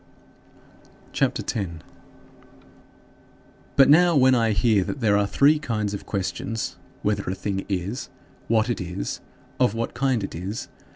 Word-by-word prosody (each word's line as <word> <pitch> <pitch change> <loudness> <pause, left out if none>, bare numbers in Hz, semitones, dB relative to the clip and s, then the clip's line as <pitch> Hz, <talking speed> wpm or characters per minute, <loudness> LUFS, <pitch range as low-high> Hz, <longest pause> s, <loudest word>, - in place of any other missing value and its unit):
CHAPTER - - 0
X - - -3
17. 85 -7 -4 1.9
But 135 - +7
now 170 +3 +6
when 130 -2 +5
I 115 -2 +3
hear 100 0 +3
that 140 - -5
there 110 -4 +3
are 100 0 +2
three 145 +8 +4
kinds 110 -7 -2
of 100 - -6
questions 100 +2 -3 0.3
"Whether 105 -2 0
a 95 - -2
thing 95 0 -3
is? 100 +6 -3 0.4
What 110 0 +2
it 120 -4 -2
is? 90 +2 -4 0.4
Of 125 -4 +3
what 115 +1 -2
kind 125 -3 0
it - - -5
is?" 95 +6 -5
110 Hz, 150 wpm, -24 LUFS, 100-125 Hz, 1.9 s, But